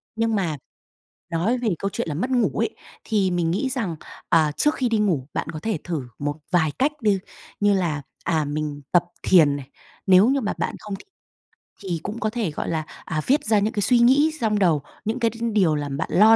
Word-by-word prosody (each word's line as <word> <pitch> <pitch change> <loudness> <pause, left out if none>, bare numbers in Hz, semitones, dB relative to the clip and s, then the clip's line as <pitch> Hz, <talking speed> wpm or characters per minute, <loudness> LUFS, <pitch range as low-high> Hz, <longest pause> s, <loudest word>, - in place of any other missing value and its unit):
Nhưng 225 0 +1
mà 170 -7 -1 0.7
nói 180 +10 +1
về 240 -2 0
câu 195 - -1
chuyện - - -2
là - - -2
mất 220 - -1
ngủ 245 -2 +3
ấy, - - -1 0.3
thì 200 -4 +1
mình 175 -2 +1
nghĩ 205 +9 0
rằng, 225 -10 -2 0.3
à, 160 -3 +4
trước 300 - +1
khi 255 -5 0
đi 225 - +2
ngủ, 175 -11 +1
bạn - - -3
có 155 - -5
thể 220 -5 0
thử 165 -4 -2 0.2
một 145 0 -2 0.2
vài 160 -4 +3
cách 280 +3 +3
đi, 205 -3 +2 0.4
như 205 0 +4
là, 170 -6 0 0.2
à, 160 -3 +1
mình 145 0 -3
tập 175 - +5 0.2
thiền 155 -6 +5
này. 140 -2 -8 0.4
Nếu 190 +4 +7
như 275 0 +2
mà 210 - -1
bạn - - -2
không 210 -2 -6
thích 195 - -14 0.8
thì 175 -4 -2
cũng 220 +3 -5
có 215 - 0
thể, 215 -6 -2
gọi - - -4
là, 160 -2 -1 0.2
à, 155 -1 -2
viết 285 +4 +3
ra 215 -1 +4
những 210 +2 0
cái 205 - -1
suy 240 +5 +4
nghĩ 275 +6 +5
xong 215 -2 +1
đầu, 165 -7 +3 0.2
những 225 +4 -1
cái 230 -2 +3
đ 225 - -12 0.2
điều 180 -7 +3
làm 145 -2 -3
bạn 160 - -3
lo 215 +4 +7
195 Hz, 230 wpm, -23 LUFS, 160-225 Hz, 0.8 s, Nếu